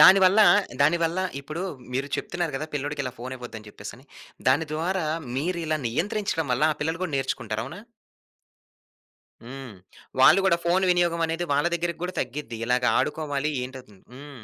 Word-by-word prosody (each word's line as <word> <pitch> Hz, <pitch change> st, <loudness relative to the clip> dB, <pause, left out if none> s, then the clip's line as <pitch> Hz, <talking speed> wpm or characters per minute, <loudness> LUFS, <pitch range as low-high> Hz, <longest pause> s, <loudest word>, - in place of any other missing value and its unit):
దానివల్ల, 190 Hz, +2 st, +8 dB, 0.4 s
దానివల్ల 165 Hz, +4 st, +3 dB, 0.2 s
ఇప్పుడు 155 Hz, +5 st, -5 dB, 0.3 s
మీరు 135 Hz, +3 st, -1 dB
చెప్తున్నారు 175 Hz, -3 st, -3 dB
గదా! 155 Hz, -, -4 dB
పిల్లోడికి 145 Hz, 0 st, -2 dB
ఇలా 125 Hz, -, -4 dB
ఫోను 130 Hz, +2 st, -5 dB
ఇవ్వొద్దని 115 Hz, -3 st, -9 dB
జెప్పేసని. 105 Hz, +5 st, -10 dB, 0.4 s
దాని 145 Hz, +5 st, +3 dB
ద్వారా 175 Hz, +1 st, -1 dB, 0.3 s
మీరిలా 160 Hz, 0 st, -1 dB
నియంత్రించడం 175 Hz, -, -1 dB
వల్ల 125 Hz, +4 st, 0 dB
ఆ -, -, -12 dB
పిల్లలు 160 Hz, +3 st, -1 dB
గూడా 175 Hz, -6 st, -2 dB
నేర్చుకుంటారు. 120 Hz, -5 st, -2 dB
అవునా? 160 Hz, +10 st, -8 dB, 1.7 s
హ్మ్. 130 Hz, -3 st, -8 dB, 0.4 s
వాళ్ళు 130 Hz, +8 st, +8 dB
గూడా 170 Hz, -3 st, +4 dB
ఫోను 185 Hz, +2 st, +3 dB
వినియోగమనేది 170 Hz, -1 st, +1 dB
వాళ్ళ 145 Hz, +2 st, +2 dB
దెగ్గరికి 170 Hz, -1 st, -2 dB
గూడ 180 Hz, +1 st, -2 dB
తగ్గిద్ది. 125 Hz, -2 st, -5 dB
ఇలాగ 125 Hz, +1 st, +1 dB
ఆడుకోవాలి 150 Hz, -1 st, -1 dB
ఏంటవు‌తుంది. 125 Hz, -6 st, -10 dB
హ్మ్. 140 Hz, -3 st, -11 dB
150 Hz, 140 wpm, -26 LUFS, 130-170 Hz, 1.7 s, దానివల్ల